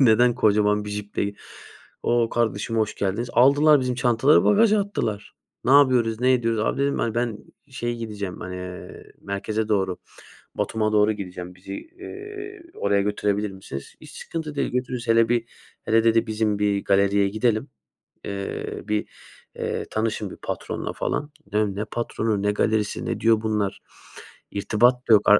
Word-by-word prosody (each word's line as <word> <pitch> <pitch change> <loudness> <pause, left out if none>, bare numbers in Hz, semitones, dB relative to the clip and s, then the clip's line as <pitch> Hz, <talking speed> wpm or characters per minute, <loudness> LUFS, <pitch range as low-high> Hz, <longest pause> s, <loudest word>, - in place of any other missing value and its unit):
Neden 120 -1 +5
kocaman 105 -1 +3
bir 105 - -6
ciple 105 0 -3
ge 100 - -4 0.7
"O, 120 -1 +2
kardeşim 115 -1 -1
hoş 110 -1 0
geldiniz." 100 +5 -1
Aldılar 145 +4 +6
bizim 125 -1 -1
çantaları 120 +3 +4
bagaja 215 0 +5
attılar. 110 - -3 0.3
Ne 130 - +1
yapıyoruz, 125 -5 +4
ne 130 +1 +4
ediyoruz? 115 -3 0
"Abi," 125 +5 0
dedim, 140 0 +1
"hani, 115 -2 -1
ben 120 -3 -1 0.3
şeye 120 -2 -3
gideceğim, 105 -5 -5
hani, 90 0 -6
eee, 90 0 -9
merkeze 105 +2 -2
doğru, 95 -4 0 0.6
Batum'a 110 -1 0
doğru 105 0 +4
gideceğim. 90 -3 -7
Bizi, 95 +1 -9
eee, 395 - -9
oraya 100 0 +1
götürebilir 105 0 0
misiniz?" 80 -8 -9
"Hiç - - -12
sıkıntı 160 -3 -5
değil, - - -1
götürürüz. 125 -1 -3
Hele 115 0 +4
bir, 120 -1 +1 0.4
hele" 115 0 +3
dedi, 115 0 +3
"bizim 110 -1 0
bir 100 -1 +1
galeriye 100 0 +3
gidelim, 110 +1 0 0.6
eee, 100 -1 -4
bir, 105 0 -1 0.5
eee - - -3
tanışın 110 -2 -1
bir - - -10
patronla - - -4
falan." 145 0 -2 0.2
Ne 105 -2 +1
Ne 105 +2 -2
patronu, 110 -3 -2
ne 105 - +2
galerisi, 105 0 0
ne - - -2
diyor 110 -1 +3
bunlar? 105 -3 -1 0.7
İrtibat 120 +5 +2
da - - +8
yok 105 - +5
ar 105 - +8
110 Hz, 160 wpm, -24 LUFS, 105-120 Hz, 0.7 s, da